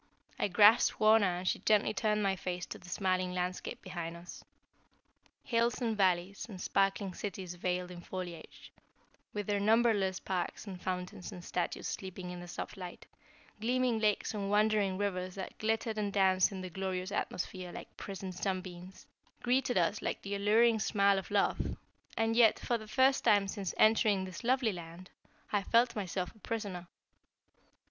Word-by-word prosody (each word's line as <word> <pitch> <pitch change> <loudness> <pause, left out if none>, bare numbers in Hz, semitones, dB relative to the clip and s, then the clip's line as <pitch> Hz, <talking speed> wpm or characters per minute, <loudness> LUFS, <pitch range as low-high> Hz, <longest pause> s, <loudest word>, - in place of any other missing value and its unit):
I - - +2
grasped 205 +4 +6
Wauna 215 -2 +5
and 180 +1 -5
she - - +1
gently 215 -1 +3
turned 210 -1 +1
my 195 -1 +2
face 180 -1 -4
to - - -8
the 180 - -13
smiling 185 -1 0
landscape 180 0 -3
behind 170 -2 -5
us. 175 +1 -11 1.0
Hills 235 -1 +1
and 230 -3 0
valleys, 190 0 +1
and 190 -4 -8
sparkling 195 0 +1
cities 190 -2 -5
veiled 180 0 -2
in 175 -1 -9
foliage, 180 -2 -8 0.6
with 205 -1 -3
their 205 0 0
numberless 210 -3 +3
parks 185 +1 -3
and 185 -3 -8
fountains 180 0 -4
and 175 -1 -9
statues 175 - -2
sleeping 185 -1 -5
in 180 - -7
the 175 - -9
soft 175 - -6
light, 180 -2 -8 0.5
gleaming 245 0 +1
lakes 215 0 +1
and 200 -2 -3
wandering 210 -2 +2
rivers 185 -2 -2
that 190 - -6
glittered 220 0 0
and 205 -1 -1
danced 190 -1 +4
in 190 -1 -5
the 185 - -5
glorious 185 +1 -3
atmosphere 185 -2 -3
like - - -10
prisoned 195 -1 -6
sunbeams, 185 -1 -5 0.4
greeted 250 -1 +2
us 180 +4 +1
like - - -3
the 200 - -4
alluring 220 +3 +4
smile 200 -2 +3
of 190 - -9
love, 205 -1 0 0.4
and 225 0 +1
yet, 230 -2 +6
for 240 -1 -1
the 215 - -10
first 260 +4 +3
time 200 -1 +4
since 195 -2 -4
entering 215 -3 +4
this 185 +2 -8
lovely 250 -1 +2
land, 175 0 -9 0.4
I 205 - +3
felt 235 +4 +3
myself 185 -3 -3
a 220 - -21
prisoner. 200 -5 -4
195 Hz, 165 wpm, -32 LUFS, 180-215 Hz, 1.0 s, grasped